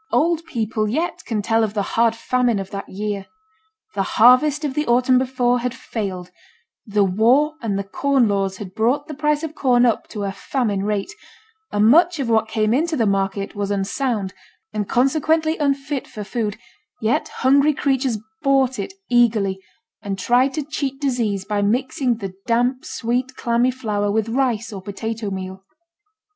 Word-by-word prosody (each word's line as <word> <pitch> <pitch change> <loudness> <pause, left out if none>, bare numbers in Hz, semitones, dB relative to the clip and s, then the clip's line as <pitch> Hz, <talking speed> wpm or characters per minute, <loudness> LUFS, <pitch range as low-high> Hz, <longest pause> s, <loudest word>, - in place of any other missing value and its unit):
Old 335 +1 +2
people 220 -7 -2
yet 320 +10 -2
can 215 -3 -2
tell 225 +2 +2
of 215 -1 -2
the 205 - +1
hard 230 0 +3
famine 245 -1 +1
of 195 -1 -5
that 195 0 -6
year. 205 0 -4 0.7
The - - -1 0.2
harvest 275 +6 +5
of 280 - -2
the 300 +2 -1
autumn 250 +1 +4
before 250 -1 +1
had 250 +1 -3
failed; 190 -8 -5 0.6
the 205 -1 +2
war 235 +11 +3
and 210 -4 -1
the 200 - -2
corn 265 +4 +1
laws 195 -2 -1
had 185 -2 -8
brought 240 +7 +1
the 305 - -6
price 300 +1 0
of 315 -1 -4
corn 250 -5 +3
up 235 - +1
to 210 -3 -5
a 195 - -2
famine 205 -1 -2
rate; 210 - -2 0.6
and 205 +1 +2
much 335 +7 +5
of 270 -5 -2
what 220 -1 +3
came 215 0 +1
into 315 +4 +1
the 230 - +2
market 195 0 -1
was 205 -1 -3
unsound, 200 +1 -1 0.4
and 210 -2 -3
consequently 315 +5 +2
unfit 280 -1 -1
for 210 - -7
food, 210 -1 -3 0.4
yet 220 +2 0
hungry 280 +3 +3
creatures 265 -4 0 0.2
bought 270 -3 +2
it 380 - -4
eagerly, 215 -6 +2 0.4
and 200 -2 -4
tried 250 +7 +2
to 305 - -1
cheat 275 -2 -4
disease 230 -9 -1
by 205 0 -1
mixing 250 +3 0
the 195 -4 -6
damp, 245 +2 +1
sweet, 250 +2 -2
clammy 235 +1 +1
flour 210 -5 -1
with 220 +1 0
rice 230 -3 0
or 195 - -6
potato 215 +2 -4
meal. 190 0 -6
235 Hz, 170 wpm, -21 LUFS, 205-270 Hz, 0.7 s, harvest